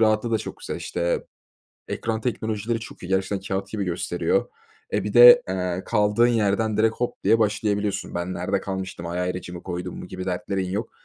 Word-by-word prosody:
rahatlığı 110 +1 +3
da 110 - +2
çok 110 - -7
güzel. - - -4
İşte, 85 0 -2 0.6
ekran 110 -1 -2
teknolojileri 110 -1 -2
çok 115 - -10
iyi. 90 - -7
Gerçekten 95 +1 0
kâğıt 95 0 -2
gibi 105 -2 -3
gösteriyor. 90 - 0 0.4
E, - - 0
bir - - -3
de, - - +10
eee, 90 0 -2
kaldığın 105 +1 +3
yerden 110 -2 +1
direkt 110 +1 +3
hop 125 - -4
diye 115 - +5
başlayabiliyorsun. 105 -1 0
“Ben 85 +1 -2
nerede 95 +2 -1
kalmıştım, 95 -3 -5
ay, 85 +1 -3
ayracımı 90 -1 -4
koydum 90 -1 -5
mu?” - - -7
gibi 95 0 -6
dertlerin 95 0 -2
yok. 105 +4 -3
100 Hz, 180 wpm, -24 LUFS, 90-110 Hz, 0.6 s, de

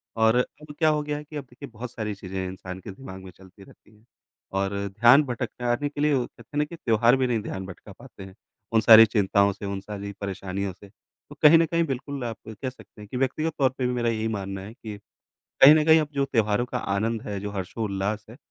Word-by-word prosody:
और 110 0 +3
अब 150 +4 -3
क्या 160 -2 +4
हो 150 -1 +1
गया 150 0 -3
है 150 - -7
कि 150 +1 -13
अब 145 - -5
देखिए 135 +3 -11
बहुत 115 +1 -8
सारी 105 -2 -4
चीज़ें 95 -1 -5
इंसान 90 0 -8
के 95 - -9
दिमाग 95 -3 -10
में 95 - -10
चलती 95 +2 -17
रहती 105 +2 -20
हैं। 105 +2 -26 0.5
और 95 0 -1 0.3
ध्यान 125 +5 +7
भटकाने 125 +1 -2
के 145 0 -6
लिए 150 0 +3
वो 130 -3 +1
कहते - - -16
हैं - - -3
ना - - +3
कि 170 - -10
त्योहार 115 -4 +3
भी 130 -1 +1
नहीं 120 -2 0
ध्यान 95 -2 -6
भटका 95 -1 -11
पाते 95 - -13
हैं, 95 -1 -12 0.4
उन 110 - +4
सारी 115 0 +9
चिंताओं 100 -2 +2
से, 100 - -9
उन 100 0 -3
सारी 100 0 -7
परेशानियों 100 0 -4
से। 100 +2 -16
तो 125 +7 -20
कहीं 155 +1 +8
न 165 - +4
कहीं 170 +1 +1
बिल्कुल 135 -1 -4
आप 115 -2 -4
कह 110 +4 -5
सकते 125 -4 -16
हैं 105 - -11
कि 125 - -5
व्यक्तिगत 150 +5 -1
तौर 135 -2 +4
पे 125 - 0
भी 125 - -1
मेरा 120 -1 0
यही 110 -1 -1
मानना 95 0 -5
है 100 +3 -9
कि 110 -4 -9 0.7
कहीं 140 +3 +11
न 155 -1 +3
कहीं 160 0 +6
अब 155 - -2
जो 140 0 +1
त्योहारों 115 -3 +1
का - - -3
आनंद 110 +3 -1
है, 100 -1 -5
जो 100 +1 -5
हर्षोल्लास 100 +1 -3
है 115 - -12
115 Hz, 245 wpm, -25 LUFS, 100-135 Hz, 0.7 s, कहीं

